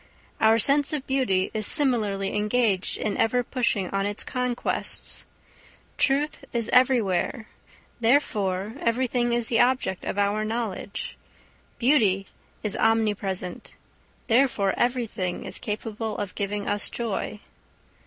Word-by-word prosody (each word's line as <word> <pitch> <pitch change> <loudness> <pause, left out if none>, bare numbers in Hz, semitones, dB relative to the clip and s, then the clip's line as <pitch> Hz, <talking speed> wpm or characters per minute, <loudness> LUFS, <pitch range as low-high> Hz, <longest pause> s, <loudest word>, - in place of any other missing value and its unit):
Our 220 +1 +5
sense 280 +6 +4
of 290 -3 -2
beauty 225 -9 +1
is 215 -1 +2
similarly 215 -10 +1
engaged 210 -2 +1
in 215 - -2
ever 245 +2 +2
pushing 235 -7 0
on 195 0 0
its 205 0 -3
conquests. 250 -1 -2 0.7
Truth 285 +2 +1
is 235 -2 -2
everywhere, 230 -4 +2 0.5
therefore 215 -5 +1
everything 240 0 0
is 235 -1 0
the 230 - +2
object 250 -7 +1
of - - -3
our 205 +1 +1
knowledge. 215 -3 -4 0.6
Beauty 220 -7 +3 0.4
is 210 -3 -2
omnipresent, 205 -5 0 0.5
therefore 230 -5 +2
everything 230 -7 -1
is - - -2
capable 215 +1 -4
of 200 -2 -4
giving 205 0 -3
us 205 0 +2
joy. 215 -2 -3
220 Hz, 115 wpm, -25 LUFS, 200-245 Hz, 0.7 s, Our